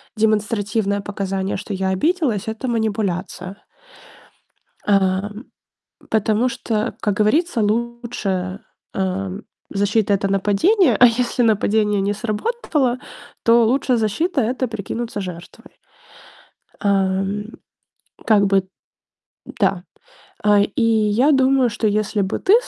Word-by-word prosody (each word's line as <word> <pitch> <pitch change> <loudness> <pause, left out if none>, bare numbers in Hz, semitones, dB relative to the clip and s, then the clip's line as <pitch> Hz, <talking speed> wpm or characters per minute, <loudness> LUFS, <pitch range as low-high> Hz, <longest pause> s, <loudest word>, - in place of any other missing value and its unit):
демонстративное 210 -1 0
показание, 195 -1 -3
что 205 +1 -6
я 190 0 -1
обиделась- 245 - 0
это 220 +4 -4
манипуляция. 200 -4 -2 1.3
А, 195 0 +2 0.8
потому 220 +3 +1
что, 225 -1 -2
как 210 - +1
говорится, 235 +5 +2
лучше, 215 -4 -2 0.3
э, 190 0 -2 0.4
защита- 205 +1 +1
это 195 0 +1
нападение. 240 - +3
А 250 - +8
если 245 +1 +2
нападение 210 -2 +2
не 200 +1 0
сработало, 255 - -1 0.4
то 230 0 +5
лучшая 255 0 +2
защита- 265 - 0
это 250 +3 -1
прикинуться 220 0 -5
жертвой. 185 +7 -10 1.1
А, 195 -2 +1 1.0
как 210 -3 +4
бы. 195 -1 +2 0.8
Да. 180 -2 -1 0.6
А, 210 -1 +5
и 205 +4 -1
я 225 +5 +3
думаю, 265 -2 +3
что 220 0 -1
если 210 0 0
бы 190 - -2
ты 385 - +3
215 Hz, 105 wpm, -20 LUFS, 195-235 Hz, 1.3 s, А